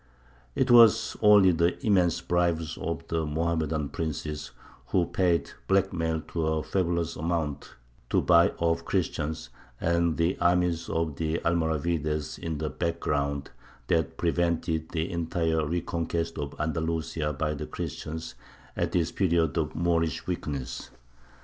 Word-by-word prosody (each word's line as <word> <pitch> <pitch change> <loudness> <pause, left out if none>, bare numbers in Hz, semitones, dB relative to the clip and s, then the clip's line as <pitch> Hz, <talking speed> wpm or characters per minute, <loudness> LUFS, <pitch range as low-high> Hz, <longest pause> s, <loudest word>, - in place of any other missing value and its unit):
It 130 -1 +2
was 115 -2 +6
only 105 -3 +7
the 85 +1 +1
immense 90 -6 +3
bribes 85 -2 0
of 80 0 -4
the 80 -1 0
Mohammedan 80 -1 -1
princes 75 -2 -4 0.4
(who 90 +3 +2
paid 85 -1 +1 0.2
blackmail 90 -5 +1
to 80 -2 -1
a 80 -1 0
fabulous 85 -3 -1
amount 80 -3 -3 0.3
to - - +3
buy 85 -1 +5
off 85 0 +1
the - - -15
Christians), 80 -4 -2 0.3
and 85 -1 +1
the 85 +2 +1
armies 85 -1 +2
of 80 -3 -1
the 80 0 0
Almoravides 80 -2 0
in 80 -2 -3
the 75 0 -3
background, 70 -4 -2 0.4
that 80 -4 +1
prevented 85 -2 0
the 80 0 -2
entire 80 -1 0
reconquest 85 0 -2
of 70 -1 -4
Andalusia 80 0 -1
by 75 +1 -1
the 75 +1 -5
Christians 80 +1 -5 0.4
at - - -1
this 85 -1 +1
period 85 -5 +1
of 80 -3 -1
Moorish 85 -3 0
weakness. 70 -8 -4
80 Hz, 130 wpm, -27 LUFS, 80-85 Hz, 0.4 s, only